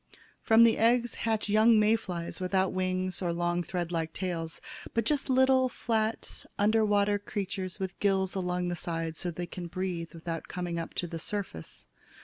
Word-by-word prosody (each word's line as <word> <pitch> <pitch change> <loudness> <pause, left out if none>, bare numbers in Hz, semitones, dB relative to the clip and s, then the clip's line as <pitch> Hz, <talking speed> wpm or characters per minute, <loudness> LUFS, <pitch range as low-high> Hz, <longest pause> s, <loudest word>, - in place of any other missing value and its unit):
From 225 +1 +6
the 230 -1 +5
eggs 240 +1 +3
hatch 220 -2 -1
young 215 +2 +5
May 215 +1 +5
flies 175 -6 -4
without 190 0 +1
wings 185 0 -1
or 175 -2 0
long 175 +1 0
thread 175 -1 -3
like 165 -1 -2
tails, 170 -4 -4 0.4
but 230 -1 +1
just 290 +1 0
little, 260 0 +4
flat, 225 -2 -2
under 215 +2 +3
water 205 -1 +2
creatures 195 -2 -4
with 190 -1 -4
gills 190 -2 +2
along 180 -1 -1
the 175 - -1
sides 165 -2 -3
so 180 - -1
they 175 +1 -4
can 175 0 -7
breathe 175 -2 -4
without 165 0 -5
coming 175 -2 -3
up 165 - -6
to - - -1
the 165 -1 -5
surface. 175 - -5
185 Hz, 175 wpm, -29 LUFS, 175-215 Hz, 0.4 s, From